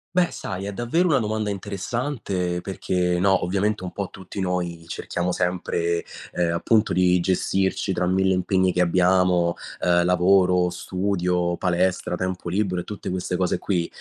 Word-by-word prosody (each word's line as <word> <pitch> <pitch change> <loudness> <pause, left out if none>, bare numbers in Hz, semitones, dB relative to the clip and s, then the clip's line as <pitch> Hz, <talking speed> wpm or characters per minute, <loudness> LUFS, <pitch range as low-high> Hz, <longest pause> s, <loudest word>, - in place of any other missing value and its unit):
Beh, 180 -1 +3
sai, 95 +1 -5
è 100 - -4
davvero 140 - +1
una 140 -4 +4
domanda 110 -1 -1
interessante 100 -2 -3
perché, 90 -2 -1
no, 95 +1 +3
ovviamente, 100 +3 0
un 90 - -5
po' 100 -2 -4
tutti 95 +1 -9
noi 90 -3 -2
cerchiamo 90 +1 -3
sempre, 85 -1 -1 0.3
ehm, 85 -1 0
appunto, 105 +6 +2
di 90 0 +3
gestirci 95 +2 0
tra 90 0 0
1.000 95 +1 +2
impegni 95 0 +1
che 90 - +2
abbiamo, 90 -1 +3 0.3
ehm, 85 0 +3
lavoro, 90 0 +3
studio, 90 -1 -1
palestra, 90 0 0
tempo 90 -1 -3
libero 90 -1 0
e - - -11
tutte 105 -3 -6
queste 90 0 -2
cose 90 -1 0
qui. 90 -4 -1
90 Hz, 155 wpm, -23 LUFS, 90-100 Hz, 0.3 s, una